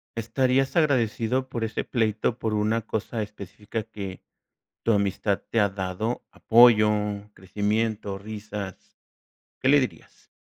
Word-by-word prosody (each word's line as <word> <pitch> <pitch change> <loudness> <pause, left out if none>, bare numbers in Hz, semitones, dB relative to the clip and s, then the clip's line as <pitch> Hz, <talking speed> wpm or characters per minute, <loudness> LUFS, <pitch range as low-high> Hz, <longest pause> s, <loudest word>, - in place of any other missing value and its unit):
Estarías 130 +3 +1
agradecido 130 -4 +1
por 115 - -3
ese 110 - -2
pleito 110 0 0
por 110 -1 -1
una 110 +2 +1
cosa 110 +1 -3
específica 105 +1 -6
que 100 -4 -7 0.6
tu 115 - +3
amistad 100 0 0
te 115 - +1
ha 100 -1 +4
dado, 95 +4 -3
apoyo, 115 -2 +6 0.4
crecimiento, 105 +2 -1
risas, 105 -1 -8 0.6
¿qué 130 - +1
le 145 +1 +7
dirías? 130 - -6
110 Hz, 120 wpm, -26 LUFS, 105-115 Hz, 0.6 s, le